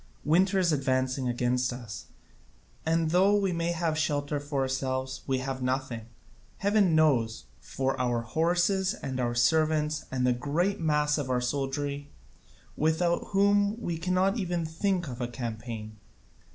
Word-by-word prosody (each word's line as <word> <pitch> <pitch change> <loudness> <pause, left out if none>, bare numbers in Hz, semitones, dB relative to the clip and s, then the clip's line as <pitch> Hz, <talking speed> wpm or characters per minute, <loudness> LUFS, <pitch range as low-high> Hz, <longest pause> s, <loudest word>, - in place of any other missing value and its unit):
Winter 185 +6 +3
is 180 -3 +3
advancing 130 -2 0
against 125 +1 0
us, 120 -4 -7 0.8
and 165 0 +2
though 190 +4 +4
we 195 -2 +1
may 170 0 -1
have 160 -2 -1
shelter 145 -1 0
for 145 -1 -2
ourselves 130 0 -2
we 135 -1 +1
have 130 0 -4
nothing, 125 -3 -2 0.5
heaven 200 -4 +3
knows, 120 -8 +2
for 135 -1 -2
our 120 -2 +1
horses 175 - +1
and 130 -2 -5
our 120 -1 0
servants 155 +3 +2
and 130 -1 0
the 125 - +4
great 155 +10 -1
mass 150 -1 +1
of 135 -3 -3
our 125 -1 +2
soldiery, 140 +2 -2 0.7
without 160 +3 +1
whom 205 +2 +2
we 175 -7 -3
cannot 185 +5 +1
even 175 -3 -1
think 175 +2 -1
of 125 -1 -6
a 120 - -1
campaign. 115 -3 -6
145 Hz, 145 wpm, -28 LUFS, 130-170 Hz, 0.8 s, though